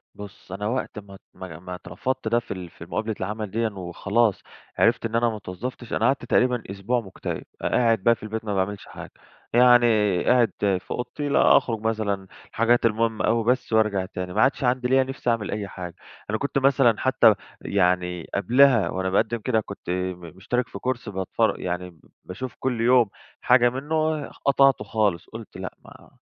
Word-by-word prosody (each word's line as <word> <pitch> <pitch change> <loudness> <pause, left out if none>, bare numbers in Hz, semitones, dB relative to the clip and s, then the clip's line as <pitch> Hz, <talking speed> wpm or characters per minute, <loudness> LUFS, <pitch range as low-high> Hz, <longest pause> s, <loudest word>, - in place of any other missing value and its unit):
بُص 100 -2 -11
أنا 105 +2 -3
وقت 120 -3 -3
ما 100 -1 -13
ت - - -38
ما 85 -3 -9
ما 90 +1 -7
اترفضت 130 +7 -4
ده 115 +2 +3
في 120 - -12
ال 90 -2 -8
في - - -12
مقابلة 110 -1 -3
العمل 105 +1 -4
ديًا 115 0 0
وخلاص 100 +3 0 0.4
عرفت - - +3
إن 115 0 -3
أنا 120 0 +3
ما 110 - -4
اتوظفتش 110 +6 -7
أنا 110 - +1
قعدت 130 -1 +1
تقريبًا 125 0 +2
أسبوع 105 +5 -1
مُكتئب، 95 -3 -6 0.2
ق - - -5
قاعد 115 -5 +2
بقى 115 0 +5
في - - -18
البيت 110 +1 -5
ما 105 - -2
باعملش 95 +1 -2
حاجة - - -10 0.4
يعني 120 0 +6 0.4
قاعد 120 -5 +4
في 95 -2 -1
أوضتي 145 +4 -4
لأ، - - +5
أخرج 115 -3 -1
مثلًا 105 -3 -1 0.2
حاجات 115 +1 +2
المهمة 115 0 +1
أوي 115 +1 +2
بس 125 0 0
وأرجع 105 -4 +2
تاني 90 -1 -6
ما - - +2
عادش 135 +1 +2
عندي 125 0 +1
ليّا 130 +1 +4
نِفس 135 0 -8
أعمل 115 -4 0
أي 105 -1 -3
حاجة، 90 -2 -8 0.3
أنا 110 - 0
كُنت 140 +2 -2
مثلًا 135 -4 +4
حتى 120 -4 +5 0.3
يعني 90 -2 0
قبلها 120 +3 +4
وأنا 95 0 -2
بأقدم 110 +4 +1
كده 110 0 0
كنت 100 -3 -10
م 90 0 -2 0.2
مشترك 125 +6 -1
في - - -9
كورس 125 -3 -3
بَتفر 95 -2 -1
يعني 90 0 -3
ب 85 -3 -21 0.3
باشوف 125 +6 -7
كل 125 -3 -1
يوم 120 -2 +4 0.3
حاجة 120 -1 +5
منه 155 +3 -1
خ - - -18
قطعته 135 -5 +4
خالص 100 -5 0
قُلت - - -10
لأ، - - -6
ما - - -16
110 Hz, 190 wpm, -24 LUFS, 95-125 Hz, 0.4 s, يعني